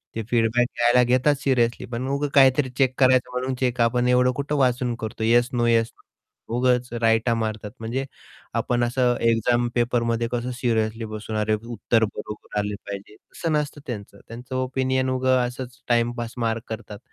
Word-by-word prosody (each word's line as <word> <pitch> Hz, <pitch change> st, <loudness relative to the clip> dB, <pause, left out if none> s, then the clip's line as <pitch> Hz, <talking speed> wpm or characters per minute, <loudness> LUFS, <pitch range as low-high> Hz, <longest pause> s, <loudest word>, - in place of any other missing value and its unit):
ते 115 Hz, -, -2 dB
फीडबॅक 120 Hz, +1 st, +2 dB
घ्यायला 120 Hz, +1 st, +4 dB
घेतात. 130 Hz, +4 st, +3 dB
सिरियसली 125 Hz, -4 st, +1 dB
पण 125 Hz, +2 st, -4 dB
उगं 140 Hz, +2 st, -1 dB
काहीतरी 135 Hz, 0 st, +5 dB
चेक 130 Hz, -2 st, +3 dB
करायचं 130 Hz, -1 st, +4 dB
म्हणून 130 Hz, +1 st, -2 dB
चेक 125 Hz, -2 st, 0 dB
आपण 120 Hz, +1 st, +2 dB
एवढं 125 Hz, 0 st, +4 dB
कुठं 145 Hz, +1 st, -2 dB
वाचून 125 Hz, -2 st, +1 dB
करतो? 110 Hz, 0 st, -5 dB
येस 120 Hz, +2 st, +4 dB
नो 120 Hz, -1 st, +1 dB
येस 115 Hz, -1 st, +2 dB
नो 115 Hz, -, -12 dB
उगाच 125 Hz, 0 st, +2 dB
राइटा 115 Hz, +1 st, +3 dB
मारतात. 110 Hz, -2 st, -3 dB
म्हणजे 120 Hz, +4 st, -3 dB, 0.6 s
आपण 120 Hz, 0 st, 0 dB
असं 125 Hz, 0 st, +2 dB
एक्झाम 120 Hz, +1 st, +2 dB
पेपरमध्ये 120 Hz, -1 st, +1 dB
कसं 120 Hz, +1 st, -2 dB
सिरियसली 115 Hz, -2 st, 0 dB
बसून 110 Hz, 0 st, -6 dB
अरे, 105 Hz, 0 st, +1 dB
उत्तर 115 Hz, +1 st, 0 dB
बरोबर 105 Hz, 0 st, -5 dB
आले 105 Hz, 0 st, -2 dB
पाहिजे 100 Hz, +1 st, -7 dB
तसं 165 Hz, +8 st, -5 dB
नसतं 150 Hz, -1 st, -2 dB
त्यांचं. 100 Hz, -4 st, -7 dB
त्यांचं 125 Hz, +3 st, -8 dB
ओपिनियन 130 Hz, 0 st, 0 dB
उगं 130 Hz, 0 st, +2 dB
असंच 125 Hz, 0 st, -8 dB
टाईमपास 120 Hz, -1 st, 0 dB
मार्क 115 Hz, 0 st, -1 dB
करतात. 110 Hz, -2 st, -7 dB
120 Hz, 165 wpm, -24 LUFS, 115-130 Hz, 0.6 s, काहीतरी